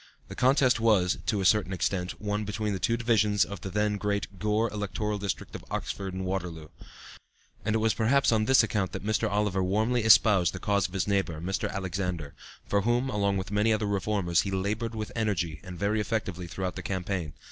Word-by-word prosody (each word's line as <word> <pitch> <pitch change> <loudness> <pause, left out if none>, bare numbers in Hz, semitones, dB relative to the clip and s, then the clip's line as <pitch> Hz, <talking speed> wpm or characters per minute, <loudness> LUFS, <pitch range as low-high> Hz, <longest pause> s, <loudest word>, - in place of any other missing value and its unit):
The - - -7
contest 130 -1 +3
was, 105 -5 +3
to 105 -3 +1
a - - -1
certain 105 -1 +3
extent, 90 0 -2
one 105 0 -2
between 105 0 -2
the 95 - -3
two 115 +3 +1
divisions 105 -4 +2
of 100 -4 -8
the 95 - -5
then 105 +1 0
great 100 -2 -3
Gore 105 +3 +1
electoral 105 0 -3
district 100 -2 -4
of - - -7
Oxford 95 -1 -4
and 95 0 -3
Waterloo; 90 -4 -4 0.9
and 110 +2 0
it - - +4
was 110 0 +2
perhaps 125 +5 +3
on 110 -1 +2
this 130 0 +5
account 105 -5 -1
that - - -5
Mr. 110 -2 +1
Oliver 100 -2 0
warmly 110 +6 +1
espoused 105 - +5
the - - -5
cause 100 -2 +1
of 95 - -12
his 95 - 0
neighbor, 95 -6 0
Mr. 95 +4 -2
Alexander, 90 -5 -3 0.3
for 100 - +1
whom, 120 +5 +1
along 100 -2 +1
with 95 +1 -4
many 105 +2 +2
other 110 -1 +1
Reformers, 100 -3 +1
he 100 - -4
labored 105 +4 -2
with 110 -1 -4
energy 90 -9 -1
and 90 -2 -8
very 105 +4 0
effectively 95 -5 -3
throughout 90 +2 -4
the 95 - -5
campaign. 90 -4 -3
100 Hz, 200 wpm, -28 LUFS, 95-110 Hz, 0.9 s, this